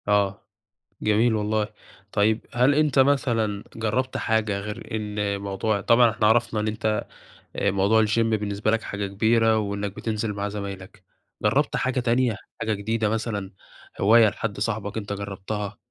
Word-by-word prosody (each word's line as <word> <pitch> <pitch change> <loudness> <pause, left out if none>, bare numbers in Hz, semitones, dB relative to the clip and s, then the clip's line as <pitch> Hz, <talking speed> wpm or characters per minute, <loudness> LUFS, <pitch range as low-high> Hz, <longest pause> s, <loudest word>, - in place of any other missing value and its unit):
آه، 100 -1 +1 0.6
جميل 110 +2 +3
والله. 105 0 0 0.4
طيب 110 +1 +1
هل 125 +4 +4
أنت 150 -3 +2
مثلًا 120 -7 +2
جربت 115 +4 -1
حاجة 110 -3 0
غير 105 +2 -7
إن 105 -2 -2
موضوع 100 +1 -1
طبعًا 115 +3 +5
إحنا 110 -1 0
عرفنا 115 0 +2
إن 105 - -1
أنت، 110 0 -1 0.5
آآ، 100 - +1
موضوع 100 +3 +3
الgym 105 +2 +1
بالنسبة 105 -2 0
لك 115 0 +1
حاجة 100 -1 -4
كبيرة 110 +3 +3
وإنك 100 -1 -3
بتنزل 110 -1 -2
مع 100 0 -3
زمايلك. 100 -1 -7 0.4
جربت - - +2
حاجة 130 0 0
تانية، 120 -1 +1 0.3
حاجة 110 0 0
جديدة 110 +1 -1
مثلًا؟ 105 -3 -3 0.5
هواية 110 +3 +6
لحد 100 0 -4
صاحبك 105 -1 -2
أنت 100 -1 -4
جربتها؟ 100 +1 -5
105 Hz, 145 wpm, -24 LUFS, 100-115 Hz, 0.6 s, هواية